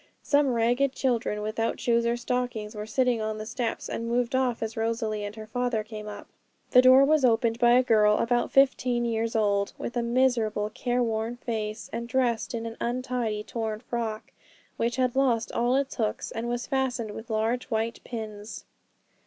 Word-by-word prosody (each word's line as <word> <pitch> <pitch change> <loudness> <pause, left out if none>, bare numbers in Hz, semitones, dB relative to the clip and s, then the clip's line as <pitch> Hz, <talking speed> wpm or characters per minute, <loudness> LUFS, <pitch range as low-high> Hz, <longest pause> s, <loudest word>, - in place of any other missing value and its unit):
Some 285 -4 +2
ragged 245 +4 +2
children, 230 -6 -1
without 225 +2 -2
shoes 235 -1 +2
or 235 +1 +1
stockings, 240 -3 -2
were 210 0 -6
sitting 245 0 +1
on 215 0 -2
the 215 - -6
steps, 230 +1 -3
and 230 - -4
moved 240 0 0
off 255 -3 +1
as 225 0 -4
Rosalie 225 -2 -1
and 205 +1 -5
her 220 -1 -8
father 235 0 -1
came 215 -1 -8
up. 205 -1 -8 0.5
The 250 - +8
door 260 +2 +7
was 305 0 +3
opened 230 -1 +2
by 240 -1 +5
a 250 +1 +5
girl 210 -3 +4
about 240 +1 +1
fifteen 250 -3 +3
years 230 0 -1
old, 200 -2 +1
with 235 - -5
a 240 - +1
miserable, 235 -4 +1
careworn 235 -2 -1
face, 220 -3 -4
and 235 +1 -3
dressed 240 -2 0
in 230 0 -4
an 225 0 -6
untidy, 240 -3 -2
torn 220 -2 -4
frock, 230 -2 -4 0.4
which 235 +1 -1
had 255 -1 0
lost 245 -4 +2
all 240 +2 +1
its 275 0 -1
hooks, 220 -3 -2
and 230 +1 -3
was 240 0 -2
fastened 260 -5 -1
with 225 +3 -9
large 225 +3 0
white 225 0 -2
pins. 215 -2 -7
235 Hz, 180 wpm, -27 LUFS, 220-250 Hz, 0.5 s, The